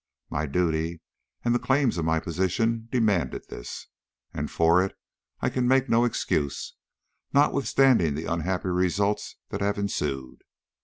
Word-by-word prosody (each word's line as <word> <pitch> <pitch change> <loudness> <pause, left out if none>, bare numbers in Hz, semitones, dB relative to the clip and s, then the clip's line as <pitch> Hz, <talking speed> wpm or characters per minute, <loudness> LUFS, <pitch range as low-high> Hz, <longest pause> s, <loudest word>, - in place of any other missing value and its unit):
My 80 +1 -1
duty 80 +1 0 0.5
and 120 - +3
the 120 - +2
claims 130 -8 +1
of 80 - -1
my 80 0 +2
position 105 +8 -1
demanded 105 - +1
this, - - -7 0.5
and 75 +1 -3
for 85 +2 +4
it 95 - -5 0.4
I - - +1
can 125 -1 0
make 130 +1 +3
no 115 +1 +4
excuse, 75 - -1 0.6
notwithstanding 135 - +3
the 80 +2 -4
unhappy 90 +3 -1
results 95 +3 0
that - - -4
have 100 0 0
ensued. 70 -10 -3
90 Hz, 140 wpm, -26 LUFS, 80-115 Hz, 0.6 s, for